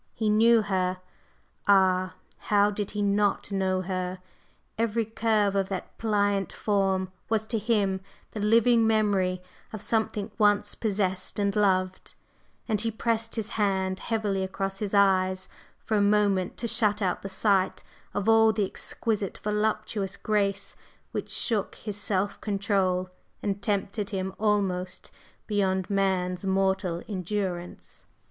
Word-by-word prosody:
He 220 -2 0
knew 225 +1 +5
her! 185 -2 -1 0.7
Ah! 185 -2 +4 0.3
how 205 0 +4
did 205 -1 -3
he 210 -1 -2
not 205 0 +1
know 190 -1 0
her? 185 0 -3 0.6
Every 230 0 0
curve 215 -2 +1
of 195 -1 0
that 190 -2 -5
pliant 205 -3 +1
form 195 -3 0 0.2
was 220 -1 +1
to 225 0 -1
him 200 -4 +1 0.3
the 215 - -6
living 230 +2 +4
memory 195 -4 +1 0.3
of 215 - -6
something 215 -1 -1
once 205 -1 +3
possessed 190 -4 -2
and 200 -1 0
loved, 185 -3 +1 0.5
and 215 -3 +1
he 230 - 0
pressed 225 0 -1
his 220 -2 -3
hand 190 -4 0
heavily 210 -4 -1
across 195 +1 -3
his 205 -1 -2
eyes 185 -2 +3 0.3
for 215 - -1
a - - +3
moment 200 -3 +2
to 235 - -2
shut 215 -2 +2
out 180 -2 0
the 195 - -6
sight 195 -1 +1 0.3
of 205 +1 -1
all 225 0 +6
the 210 -2 0
exquisite 205 +1 -3
voluptuous 210 -2 -1
grace 200 -2 -1 0.4
which - - -4
shook 220 -5 0
his 210 -2 -6
self 200 0 -1
control 195 -3 0 0.3
and 200 -1 -2
tempted 205 -1 -1
him 190 -2 -3
almost 195 -4 -1 0.3
beyond 190 -3 0
man's 185 -2 0
mortal 190 -2 0
endurance. 185 -2 -4
200 Hz, 135 wpm, -27 LUFS, 190-215 Hz, 0.7 s, all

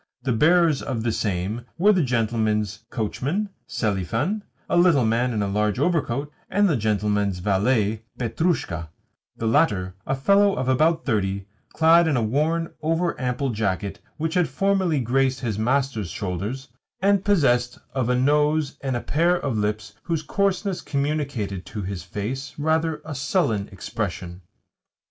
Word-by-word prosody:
The 130 - 0
bearers 160 +4 +4
of 115 -4 -3
the 115 - +1
same 105 +2 -2
were 205 +5 +5
the 185 - +2
gentleman's 110 -5 0
coachman, 140 - -2 0.2
Selifan 115 - -1 0.3
(a - - 0
little 175 -8 +5
man 120 +3 +1
in 105 -3 0
a - - -1
large 105 +2 0
overcoat), 145 -2 0 0.2
and 205 +1 +3
the 165 - +2
gentleman's 105 -3 0
valet, 105 +3 +1 0.2
Petrushka 115 - -1 0.5
the 115 - -3
latter 100 - +2
a 135 - +1
fellow 200 +8 +4
of 130 - -2
about 160 +5 +2
thirty, 100 -5 0 0.2
clad 165 +1 +5
in 145 -5 +2
a 120 - +1
worn, 155 +8 0
over 165 +2 +1
ample 125 +1 -1
jacket 100 -2 -2 0.2
which 160 +2 -2
formerly 180 +1 +1
had 130 - -1
graced 130 +1 +1
his 110 -5 -2
master's 125 -4 0
shoulders, 105 +7 -4 0.3
and 200 0 +3
possessed 125 -12 +2 0.2
of 125 -2 0
a 125 - +3
nose 150 +2 +2
and 135 -2 -1
a 120 - -2
pair 170 +4 +2
of 140 -8 -2
lips 105 -1 -2
whose 165 -3 -2
coarseness 195 +3 0
communicated 140 - -2
to 105 - -5
his 95 -1 -4
face 105 +10 -5
rather 160 +1 0
a 155 - -5
sullen 130 - 0
expression. 95 -3 -5
130 Hz, 150 wpm, -24 LUFS, 105-160 Hz, 0.5 s, were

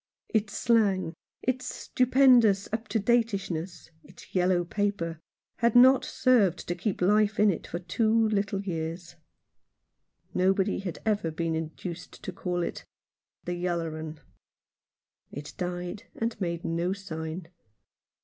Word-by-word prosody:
Its 210 -2 0
slang, 200 -7 +2 0.3
its 255 0 -1
stupendous 250 -6 +4
up 220 0 -2
to 215 - 0
dateishness, 195 -7 -1
its - - -16
yellow 180 -1 +2
paper, 175 -4 -2 0.4
had 235 0 +2
not 260 +2 +7
served 235 -9 +2
to 175 - 0
keep 185 +1 -2
life 210 +2 +3
in 210 -1 +6
it 170 - -5
for - - -4
two 185 +6 0 0.2
little 200 -1 -1
years. 165 -1 -4 1.2
Nobody 190 +1 +2
had 185 -4 -5
ever 210 -6 +1
been 165 +1 -2
induced 165 +2 -6
to - - -4
call 175 -1 -2
it - - -4 0.6
"The 175 - -2
yaller 170 -2 -2
'un." 155 -1 -7 1.1
It 145 +1 -8
died 180 +3 -4
and 225 -1 -3
made 170 -2 -2
no 170 +3 0
sign. 160 -3 -6
185 Hz, 130 wpm, -28 LUFS, 170-215 Hz, 1.2 s, not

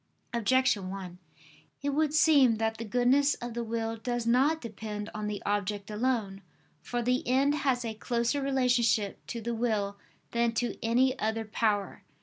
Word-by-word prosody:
Objection 235 -4 +2
1: 185 -2 -7 0.6
It 285 - 0
would 300 +1 +1
seem 290 -6 +5
that 220 0 -1
the 230 - -5
goodness 250 +6 +3
of 240 -1 -7
the 235 0 -3
will 225 0 -3
does 240 +1 -3
not 270 +7 +3
depend 215 -3 -6
on 215 0 -4
the 210 -1 -4
object 205 0 -2
alone. 210 -4 -1 0.4
For 240 +5 -3
the 250 +2 +1
end 270 +3 +3
has 265 -5 0
a 225 - -3
closer 235 +5 -1
relationship 245 -6 +1
to 235 - -5
the 235 +2 -3
will 210 -4 -1 0.3
than 235 0 +1
to 240 +1 -1
any 255 +3 +2
other 220 +1 -1
power. 210 -2 -1
235 Hz, 160 wpm, -29 LUFS, 215-255 Hz, 0.6 s, seem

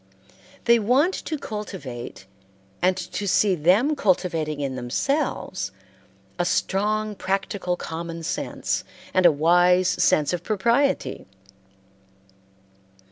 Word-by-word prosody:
They 235 0 +5
want 260 - +3
to 315 - -4
cultivate 175 - -7 0.6
and 185 +1 +2
to 190 +3 -4
see 195 +1 +3
them 190 - +3
cultivating 170 - 0
in 135 -2 -2
themselves 125 - -2 0.7
a - - +3
strong 210 +4 0
practical 195 -2 -2
common 165 0 -6
sense 160 - -2 0.3
and 185 -1 +6
a - - +6
wise 175 +4 +4
sense 150 -3 +2
of 175 - -2
propriety. 235 +8 0
185 Hz, 100 wpm, -24 LUFS, 165-215 Hz, 0.7 s, and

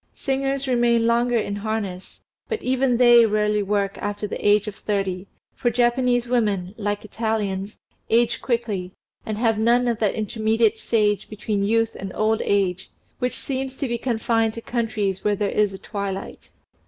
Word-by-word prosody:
Singers 270 0 -1
remain 240 -2 +3
longer 235 +1 +2
in 205 -2 -2
harness, 205 -3 -4 0.3
but 450 - -1
even 255 -1 +2
they 240 -1 +7
rarely 210 -1 +1
work 200 0 -1
after 205 +1 -3
the 205 - -5
age 205 0 +4
of 210 - -4
thirty, 195 -2 -2 0.3
for 240 - +1
Japanese 245 0 +2
women, 205 -7 0
like 205 -1 -3
Italians, 210 -2 -2 0.3
age 235 +1 +2
quickly, 215 -7 -2 0.3
and 215 -1 -2
have 225 -1 +1
none 240 +2 +3
of 235 -2 0
that 210 -3 +1
intermediate 220 +1 +1
stage 210 -3 +1
between 210 -1 -2
youth 225 +2 +1
and 195 -1 -5
old 220 +1 +1
age, 185 -2 0 0.3
which 250 0 -1
seems 265 -1 -4
to 275 - -2
be 235 -1 -2
confined 225 -2 0
to 230 - -6
countries 215 -5 -2
where 210 0 +2
there 200 0 -1
is 210 -2 +2
a 190 - -7
twilight. 195 -1 -6
220 Hz, 165 wpm, -23 LUFS, 205-240 Hz, 0.3 s, they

